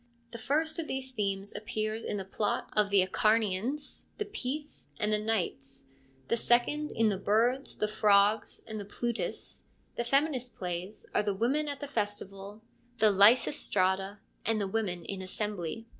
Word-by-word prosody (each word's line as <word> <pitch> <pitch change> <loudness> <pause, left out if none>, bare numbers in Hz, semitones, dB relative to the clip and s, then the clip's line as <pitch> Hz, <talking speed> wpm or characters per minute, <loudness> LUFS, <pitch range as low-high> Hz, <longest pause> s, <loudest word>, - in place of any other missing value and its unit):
The 235 - -7
first 315 +7 0
of 320 - -3
these 265 0 -4
themes 200 -3 -2
appears 215 +1 -3
in 205 - -2
the 195 - -4
plot 205 +2 -2
of 210 -1 +3
the 200 -2 +5
Acharnians, 220 +7 0
the 420 - -2
Peace, 295 - -5
and 210 0 +1
the 210 - +3
Knights; 180 -11 -2 0.4
the - - +2
second 245 +6 +2
in 225 -1 +2
the 195 -2 -1
Birds, 235 +7 +1
the 210 - +1
Frogs, 210 0 +3
and 220 -1 -6
the - - -4
Plutus; 235 +3 -4 0.4
the 240 - 0
feminist 265 -1 +1
plays 180 +3 -5
are - - +3
the 205 -2 -1
Women 270 +9 +1
at 285 -1 -4
the 285 - -4
Festival, 205 -3 -4 0.3
the 215 -2 +5
Lysistrata, 200 -3 +4 0.3
and 225 -1 +1
the 200 - -1
Women 190 -5 -2
in 195 -1 -4
Assembly. 205 +1 -4
215 Hz, 160 wpm, -30 LUFS, 200-245 Hz, 0.4 s, the